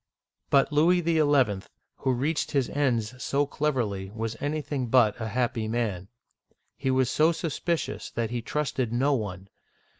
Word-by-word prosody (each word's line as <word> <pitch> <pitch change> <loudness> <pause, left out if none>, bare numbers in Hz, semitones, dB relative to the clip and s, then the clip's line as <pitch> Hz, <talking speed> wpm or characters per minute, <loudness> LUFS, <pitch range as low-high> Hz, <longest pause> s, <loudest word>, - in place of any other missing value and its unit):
But 140 +1 +3
Louis 170 +4 +4
XL, 145 - +3 0.4
who 135 - 0
reached 145 +6 0
his 135 -3 0
ends 125 -3 -1
so 145 +1 +1
cleverly, 120 -10 -1
was 115 +2 -4
anything 145 -3 -2
but 120 -2 +3
a 110 - -2
happy 120 0 -1
man. 110 -5 -2 0.7
He 135 - -2
was 130 -1 +3
so 155 +6 +3
suspicious 165 +1 -2
that 115 -1 -3
he 120 -1 -2
trusted 135 -2 -2
no 135 +5 +2
one. 100 -6 -3
130 Hz, 145 wpm, -27 LUFS, 115-145 Hz, 0.7 s, Louis